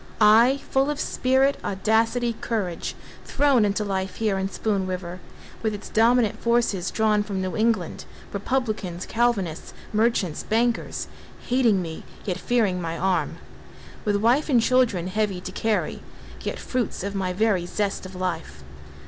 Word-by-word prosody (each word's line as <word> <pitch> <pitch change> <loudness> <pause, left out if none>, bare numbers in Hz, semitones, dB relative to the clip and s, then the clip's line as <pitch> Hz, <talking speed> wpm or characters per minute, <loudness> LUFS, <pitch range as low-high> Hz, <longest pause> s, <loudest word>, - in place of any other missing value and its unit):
I, 230 +6 +6
full 270 +2 +3
of 295 0 -2
spirit, 265 +1 +2
audacity, 225 +4 +1
courage 195 -7 -2 0.3
Thrown 280 -5 +3
into 205 +1 +1
life 190 -1 -2
here 210 -4 0
in 190 0 -1
Spoon 200 -2 -1
River, 180 -1 -5 0.4
With 220 -2 -1
its 205 - -9
dominant 230 0 +3
forces 235 -6 +1
drawn 215 -1 +2
from 205 -2 -3
New 185 -1 -2
England, 215 -6 0 0.3
Republicans, 205 -5 -2
Calvinists, 215 -9 -1 0.2
merchants, 215 -7 +1
bankers, 230 +1 0 0.4
Hating 235 -7 +3
me, 160 -1 -7 0.2
yet 185 -2 -2
fearing 210 -7 +1
my 165 0 -3
arm. 185 +1 0 0.7
With 205 -2 +1
wife 240 +9 +2
and 250 -4 +5
children 230 -7 +2
heavy 195 0 -1
to 185 +1 -7
carry— 220 +3 -1 0.4
Yet - - -3
fruits 245 -7 -2
of 200 0 -3
my 190 -2 -1
very 190 -2 +1
zest 205 +1 -2
of 185 0 -9
life. 170 - -4
210 Hz, 145 wpm, -24 LUFS, 185-235 Hz, 0.7 s, I